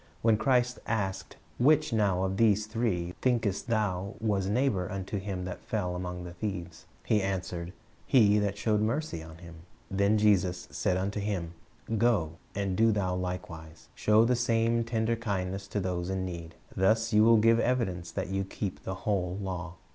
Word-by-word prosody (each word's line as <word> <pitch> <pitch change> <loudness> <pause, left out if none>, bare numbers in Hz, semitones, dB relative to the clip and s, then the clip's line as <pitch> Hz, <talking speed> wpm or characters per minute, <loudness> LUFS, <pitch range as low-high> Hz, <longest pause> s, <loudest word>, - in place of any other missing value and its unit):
When 115 -1 +5
Christ 125 +2 +1
asked, 95 -4 -2 0.2
"Which 150 +1 +4
now 100 -4 +2
of 95 0 -1
these 110 -1 +3
three, 110 -6 -1
thinkest 115 -5 0
thou, 100 -4 -1
was 100 -4 0
neighbor 105 -6 +1
unto 95 +1 -3
him 95 -2 -4
that 90 - -6
fell 90 -5 -2
among 90 0 -5
the 90 0 -8
thieves?" 85 -3 -5 0.2
he 105 - +2
answered, 90 -3 -3 0.4
"He 105 -6 +5
that 100 -1 -1
showed 105 0 +1
mercy 115 - -1
on 80 0 -11
him." 85 -1 -12 0.3
"Then 100 +2 +3
said 105 - 0
Jesus 90 -9 +1
unto 95 +3 0
him, 95 -5 -3 0.5
Go, 95 -9 +2 0.2
and 100 -2 -1
do 115 +3 +4
thou 95 -3 0
likewise." 90 -3 -6
Show 110 +2 +4
the 125 +1 +3
same 115 -1 +2
tender 115 0 0
kindness 95 -3 -3
to 100 - -2
those 90 -2 -2
in 95 -1 -1
need. 85 -2 -7 0.2
Thus 110 +4 +2
you 105 0 +6
will 115 0 +6
give 115 +1 +4
evidence 115 -9 0
that - - -3
you 95 0 -1
keep 95 0 -5
the 95 - -4
whole 95 -3 0
law. 90 -2 -5
100 Hz, 170 wpm, -29 LUFS, 90-110 Hz, 0.5 s, you